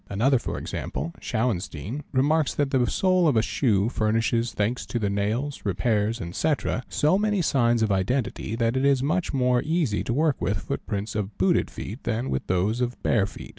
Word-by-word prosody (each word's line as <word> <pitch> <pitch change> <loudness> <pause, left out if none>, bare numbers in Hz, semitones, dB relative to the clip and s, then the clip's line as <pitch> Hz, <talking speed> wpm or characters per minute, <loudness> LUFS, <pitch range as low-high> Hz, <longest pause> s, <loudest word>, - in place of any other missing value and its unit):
Another, 125 +6 +2
for - - -4
example 75 +6 -4
Shauenstein, 110 - -2
remarks 145 +3 +2
that 145 -2 0
the 125 -3 +2
sole 185 -2 +3
of 140 -6 +3
a 110 - +3
shoe 110 -5 +1
furnishes, 115 +1 0
thanks 110 +4 -1
to - - -2
the 100 -3 0
nails, 110 +8 -1
repairs, 105 +3 0 0.2
&c., 155 -1 +2 0.4
so 155 +6 +2
many 210 -3 +1
signs 120 -5 +2
of 110 - +1
identity 105 +3 -1
that 115 0 +1
1t 130 +1 0
is 140 -2 +3
much 170 +5 0
more 125 -2 +2
easy 155 -9 0
to - - -2
work 150 +3 +2
with 95 +4 0
footprints 105 -3 -4
of 105 -1 -4
booted 95 0 +2
feet 110 +7 -7
than 120 +3 -2
with 65 - -2
those 100 +7 +1
of 125 0 -2
bare 100 -4 +2
feet. 100 - -10
120 Hz, 185 wpm, -25 LUFS, 105-140 Hz, 0.4 s, sole